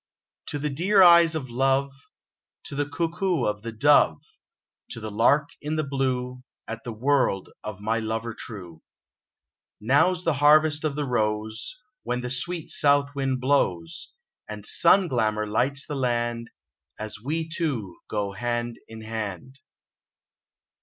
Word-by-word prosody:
To 145 Hz, -, -3 dB
the 150 Hz, 0 st, -2 dB
dear 185 Hz, +7 st, +4 dB
eyes 170 Hz, -2 st, +7 dB
of 130 Hz, -6 st, -5 dB
love, 135 Hz, +2 st, +1 dB, 0.7 s
To -, -, -8 dB
the 145 Hz, 0 st, -1 dB
coo 165 Hz, +3 st, -2 dB
coo 180 Hz, -7 st, 0 dB
of 105 Hz, 0 st, -2 dB
the 115 Hz, +1 st, -6 dB
dove, 115 Hz, -, +4 dB, 0.7 s
To -, -, -7 dB
the 110 Hz, -1 st, -6 dB
lark 140 Hz, +7 st, +3 dB
in 150 Hz, +1 st, -3 dB
the 155 Hz, -, 0 dB
blue, 130 Hz, -2 st, -2 dB, 0.3 s
At 115 Hz, +1 st, -6 dB
the 120 Hz, -, -5 dB
word 125 Hz, -4 st, 0 dB
of 105 Hz, -2 st, -7 dB
my 110 Hz, +2 st, 0 dB
lover 115 Hz, +1 st, -3 dB
true. 90 Hz, -8 st, -9 dB, 1.0 s
Now's 160 Hz, +10 st, +2 dB
the 165 Hz, -, +2 dB
harvest 150 Hz, +2 st, +4 dB
of 150 Hz, -3 st, -1 dB
the 150 Hz, -1 st, -2 dB
rose, 110 Hz, -2 st, -2 dB, 0.2 s
When 125 Hz, 0 st, -3 dB
the 125 Hz, 0 st, -4 dB
sweet 165 Hz, +5 st, -3 dB
south 145 Hz, 0 st, +3 dB
wind 135 Hz, -2 st, -1 dB
blows, 90 Hz, -12 st, 0 dB, 0.4 s
And 105 Hz, -1 st, -7 dB
sun 185 Hz, -, +4 dB
glamour 110 Hz, -6 st, 0 dB
lights 130 Hz, +7 st, 0 dB
the -, -, -6 dB
land, 120 Hz, -3 st, -1 dB, 0.5 s
As 110 Hz, -1 st, -6 dB
we 160 Hz, +4 st, -2 dB
two 135 Hz, -, -3 dB
go 100 Hz, -2 st, -2 dB
hand 120 Hz, +2 st, -3 dB
in 110 Hz, 0 st, -10 dB
hand 110 Hz, +3 st, -6 dB
125 Hz, 145 wpm, -25 LUFS, 110-145 Hz, 1.0 s, eyes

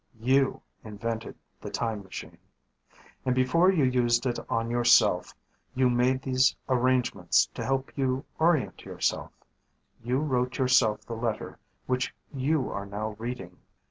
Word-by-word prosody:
You 130 Hz, +3 st, +2 dB, 0.2 s
invented 110 Hz, +1 st, -5 dB, 0.3 s
the -, -, -6 dB
time 110 Hz, -3 st, -2 dB
machine. 95 Hz, -1 st, -9 dB, 0.8 s
And 130 Hz, -1 st, +1 dB
before 165 Hz, +9 st, +4 dB
you 165 Hz, -7 st, +2 dB
used 125 Hz, -1 st, +2 dB
it 120 Hz, -2 st, -1 dB
on 115 Hz, -1 st, -1 dB
yourself, 120 Hz, -6 st, +4 dB, 0.4 s
you 130 Hz, -1 st, +3 dB
made 125 Hz, +2 st, +1 dB
these 130 Hz, 0 st, +3 dB
arrangements 125 Hz, -7 st, +2 dB
to -, -, -5 dB
help 135 Hz, 0 st, -2 dB
you 135 Hz, 0 st, -1 dB
orient 155 Hz, -, +1 dB
yourself. -, -, -2 dB, 0.7 s
You 125 Hz, +2 st, 0 dB
wrote 125 Hz, -4 st, 0 dB
yourself 125 Hz, -5 st, +3 dB
the 115 Hz, -, -6 dB
letter 115 Hz, -1 st, -4 dB, 0.3 s
which 125 Hz, -2 st, -1 dB, 0.2 s
you 140 Hz, +1 st, 0 dB
are 100 Hz, 0 st, -5 dB
now 105 Hz, +2 st, -3 dB
reading. 115 Hz, -7 st, -6 dB
125 Hz, 135 wpm, -27 LUFS, 115-130 Hz, 0.8 s, before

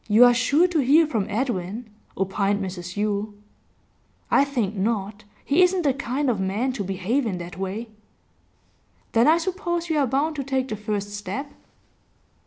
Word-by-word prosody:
'You 220 Hz, +3 st, +7 dB
are 245 Hz, -, +6 dB
sure 285 Hz, +8 st, +3 dB
to 340 Hz, -3 st, +1 dB
hear 295 Hz, +5 st, +5 dB
from 225 Hz, -10 st, -1 dB
Edwin,' 220 Hz, -1 st, -2 dB, 0.3 s
opined 195 Hz, +1 st, 0 dB
Mrs 180 Hz, -2 st, -6 dB
Yule. 205 Hz, 0 st, -1 dB, 1.0 s
'I 280 Hz, -, +5 dB
think 235 Hz, -8 st, -2 dB
not. 205 Hz, 0 st, -2 dB, 0.2 s
He 295 Hz, +6 st, +3 dB
isn't 360 Hz, 0 st, +3 dB
the 280 Hz, -3 st, +3 dB
kind 275 Hz, +2 st, -2 dB
of 235 Hz, -6 st, +1 dB
man 205 Hz, +8 st, -1 dB
to 215 Hz, -, -3 dB
behave 195 Hz, +8 st, -1 dB
in 190 Hz, -4 st, -2 dB
that 175 Hz, 0 st, -7 dB
way.' 195 Hz, +5 st, -4 dB, 1.2 s
'Then 230 Hz, +3 st, +4 dB
I 320 Hz, +2 st, +6 dB
suppose 345 Hz, -1 st, -2 dB
you 310 Hz, -, +2 dB
are 275 Hz, -, +2 dB
bound 290 Hz, +5 st, 0 dB
to 275 Hz, -, -2 dB
take 265 Hz, -1 st, -1 dB
the 215 Hz, -, -2 dB
first 205 Hz, -1 st, -3 dB
step? 205 Hz, +8 st, -5 dB
230 Hz, 170 wpm, -24 LUFS, 200-280 Hz, 1.2 s, You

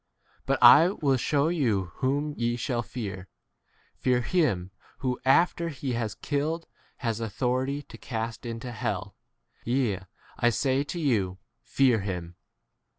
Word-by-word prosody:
But -, -, +2 dB
I 165 Hz, +3 st, +9 dB
will 145 Hz, -8 st, +1 dB
shew 145 Hz, +4 st, +1 dB
you 110 Hz, -, 0 dB
whom 145 Hz, +3 st, 0 dB
ye 120 Hz, 0 st, 0 dB
shall 120 Hz, 0 st, -1 dB
fear: 100 Hz, -6 st, -6 dB, 0.7 s
Fear 125 Hz, -1 st, +2 dB
him 120 Hz, -, +1 dB, 0.3 s
who 125 Hz, -2 st, -2 dB
after 170 Hz, +5 st, +3 dB
he 135 Hz, -3 st, -4 dB
has 115 Hz, -3 st, -2 dB
killed 155 Hz, +3 st, -2 dB, 0.4 s
has 115 Hz, -1 st, 0 dB
authority 130 Hz, +5 st, -1 dB
to -, -, -13 dB
cast 115 Hz, -1 st, -4 dB
into 115 Hz, +1 st, -5 dB
hell. 105 Hz, -3 st, -3 dB, 0.5 s
6 -, -, -20 dB
Yea, 120 Hz, -6 st, +1 dB, 0.4 s
I 120 Hz, -, +4 dB
say 130 Hz, +3 st, +1 dB
to 175 Hz, -, -5 dB
you, 105 Hz, -, +1 dB, 0.2 s
Fear 130 Hz, -5 st, +3 dB
him. 90 Hz, -3 st, -5 dB
125 Hz, 140 wpm, -27 LUFS, 110-140 Hz, 0.7 s, I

